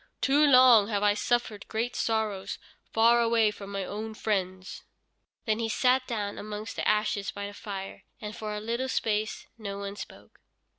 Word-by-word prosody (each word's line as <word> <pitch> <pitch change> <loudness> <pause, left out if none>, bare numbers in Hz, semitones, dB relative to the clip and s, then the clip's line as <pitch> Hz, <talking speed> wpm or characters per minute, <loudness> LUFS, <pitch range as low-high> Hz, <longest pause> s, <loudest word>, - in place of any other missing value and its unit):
Too 290 +2 +4
long 250 -6 +7
have 205 -2 -1
I 205 0 +5
suffered 220 -1 -1
great 230 +3 -2
sorrows 210 -4 -1 0.3
far 230 +1 +5
away 230 -2 +3
from 200 -1 -9
my 195 -1 -3
own 220 +2 -5
friends." 185 -3 -2 0.6
Then 220 -1 +1
he 225 -1 -1
sat 255 +3 +2
down 210 -4 -3
amongst 210 +1 -6
the - - -2
ashes 210 -1 +1
by 200 0 -5
the 205 - -7
fire, 195 -2 -7 0.2
and 210 0 -6
for 215 -2 -5
a - - -3
little 235 +4 -2
space 215 -3 -1
no 200 -2 -5
one 200 0 -5
spoke. - - -11
215 Hz, 170 wpm, -28 LUFS, 205-230 Hz, 0.6 s, long